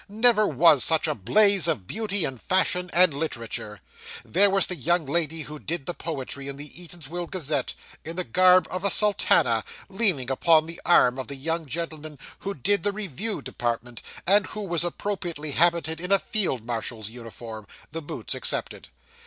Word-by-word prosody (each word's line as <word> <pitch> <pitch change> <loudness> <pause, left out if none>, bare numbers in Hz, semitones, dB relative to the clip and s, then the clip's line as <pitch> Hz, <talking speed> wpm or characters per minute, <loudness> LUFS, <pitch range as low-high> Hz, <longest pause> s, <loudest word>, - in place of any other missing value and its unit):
Never 215 0 +4
was 160 -9 +5
such 160 0 +2
a 155 - 0
blaze 200 - +3
of 145 - -1
beauty, 205 - -1
and 130 -3 -6
fashion, 180 -1 +1
and 180 -3 +4
literature. 115 - -4 0.4
There 200 +4 +3
was 195 0 +4
the 180 - -4
young 175 -1 0
lady 160 +2 -1
who 150 0 -9
'did' 165 -2 -5
the 175 - -3
poetry 140 -4 -5
in 140 0 -6
the 145 +1 -8
Eatanswill 175 0 -7
Gazette, 150 -7 -2 0.3
in 165 +1 -5
the 180 - -1
garb 185 +8 +4
of 185 +1 -4
a 200 - +2
sultana, 160 - +4 0.3
leaning 190 - +1
upon 160 +3 +4
the 165 +1 -9
arm 130 -7 +4
of 130 - -5
the 140 - -6
young 160 +3 -3
gentleman 155 0 -5 0.2
who 200 0 -5
'did' 200 +10 +1
the 205 - 0
review 205 - -1
department, 120 0 -4 0.2
and 200 +1 +4
who 215 - -6
was 170 -5 0
appropriately 175 -4 -4
habited 165 +1 +1
in 180 +2 -5
a 195 - +6
field 185 - -1
marshal's 115 -2 -5
uniform 115 -2 -9 0.2
the 165 +2 -5
boots 145 - -5
excepted. - - -2
165 Hz, 175 wpm, -25 LUFS, 135-185 Hz, 0.4 s, a